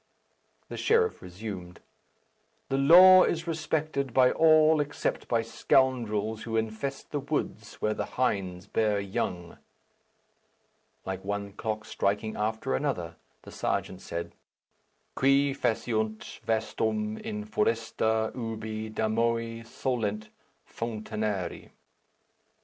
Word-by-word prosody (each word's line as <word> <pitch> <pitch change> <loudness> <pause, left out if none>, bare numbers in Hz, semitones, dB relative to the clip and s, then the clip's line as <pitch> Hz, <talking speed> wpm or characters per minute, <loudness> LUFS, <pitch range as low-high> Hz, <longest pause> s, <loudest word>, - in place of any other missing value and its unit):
The - - -7
sheriff 450 0 +2
resumed. 90 -2 -8 0.9
"The 135 - +1
law 185 +6 +9
is 165 -2 +1
respected 155 -5 -2
by 130 -1 +6
all 155 -1 +5
except 145 0 -3
by 115 -1 +1
scoundrels 115 -2 +1
who 115 -1 -2
infest 110 +5 -3
the 145 - -1
woods 140 -6 -3
where 110 - +2
the - - -3
hinds 95 -7 -1
bear 105 0 +1
young." 90 -3 -4 1.5
Like 95 0 -4
one 100 0 -3
clock 110 +1 -4
striking 105 +2 -1
after 110 -7 -1
another, - - -2 0.3
the - - -11
serjeant 95 0 -2
said, 85 0 -5 0.8
"Qui 140 +1 +3
faciunt 110 -4 -2
vastum 110 -1 -1
in 105 0 -5
foresta 110 0 0
ubi 110 -2 -5
damoe 115 +1 0
solent 110 -3 -3 0.4
founinare." 110 -5 -4
110 Hz, 105 wpm, -28 LUFS, 105-130 Hz, 1.5 s, law